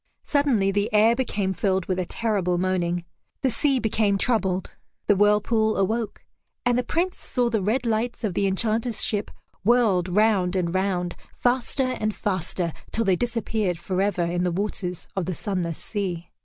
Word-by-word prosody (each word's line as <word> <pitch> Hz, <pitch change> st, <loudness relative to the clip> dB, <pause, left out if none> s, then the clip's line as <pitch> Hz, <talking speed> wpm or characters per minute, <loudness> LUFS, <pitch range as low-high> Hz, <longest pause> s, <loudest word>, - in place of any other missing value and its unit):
Suddenly 260 Hz, -10 st, +2 dB
the 205 Hz, +1 st, 0 dB
air 215 Hz, +2 st, +5 dB
became 205 Hz, -7 st, -1 dB
filled 190 Hz, 0 st, 0 dB
with 185 Hz, -1 st, -1 dB
a 180 Hz, -, -1 dB
terrible 195 Hz, -4 st, 0 dB
moaning; 175 Hz, -1 st, 0 dB, 0.4 s
the 260 Hz, -, +3 dB
sea 275 Hz, +3 st, +2 dB
became 215 Hz, -3 st, +1 dB
troubled; 190 Hz, -5 st, 0 dB, 0.3 s
the 205 Hz, -, +4 dB
whirlpool 210 Hz, +2 st, +3 dB
awoke. 220 Hz, +3 st, -1 dB, 0.4 s
And 245 Hz, 0 st, +3 dB
the 250 Hz, -, +2 dB
Prince 355 Hz, +6 st, -1 dB
saw 245 Hz, -2 st, -1 dB
the 220 Hz, -3 st, +1 dB
red 230 Hz, +6 st, 0 dB
lights 230 Hz, +2 st, -1 dB
of 205 Hz, -5 st, 0 dB
the 200 Hz, -, +1 dB
Enchanter's 220 Hz, +4 st, 0 dB
ship 205 Hz, -2 st, 0 dB, 0.3 s
whirled 205 Hz, -5 st, +3 dB
round 195 Hz, -2 st, +2 dB
and 175 Hz, -2 st, 0 dB
round, 185 Hz, -2 st, 0 dB, 0.2 s
faster 255 Hz, +1 st, +1 dB
and 215 Hz, -1 st, -1 dB
faster, 180 Hz, -3 st, -2 dB, 0.2 s
till 230 Hz, -, +1 dB
they 190 Hz, -2 st, +4 dB
disappeared 220 Hz, -4 st, -1 dB
forever 190 Hz, 0 st, 0 dB
in 175 Hz, +1 st, 0 dB
the 180 Hz, -, +2 dB
waters 180 Hz, -1 st, -3 dB
of 185 Hz, -3 st, -1 dB
the 185 Hz, -, -2 dB
sunless 180 Hz, -5 st, -2 dB
sea. 185 Hz, -5 st, -4 dB
205 Hz, 165 wpm, -25 LUFS, 185-230 Hz, 0.4 s, air